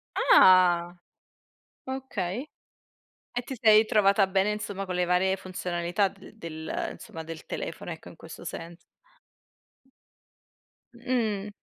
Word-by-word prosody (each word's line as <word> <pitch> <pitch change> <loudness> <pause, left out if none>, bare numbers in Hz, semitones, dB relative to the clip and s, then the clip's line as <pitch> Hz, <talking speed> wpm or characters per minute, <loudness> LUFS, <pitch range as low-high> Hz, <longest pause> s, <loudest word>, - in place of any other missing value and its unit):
Ah 175 -2 +5 0.9
okay 255 -3 -4 0.9
e 245 - 0
ti 265 +2 -7
sei 215 -1 +6
trovata 200 -2 +3
bene 195 +2 +1
insomma 205 -2 -4
con 180 - -4
le 180 0 +1
varie 180 +2 +2
funzionalità 180 +1 -1
de 195 +2 -16
del 160 -5 -5
insomma 165 - -9
del 165 0 -9
telefono - - -5
ecco - - -8
in - - -13
questo - - -11
senso. 165 +1 -7 2.2
Mh. 235 -5 -2
190 Hz, 115 wpm, -27 LUFS, 175-215 Hz, 2.2 s, sei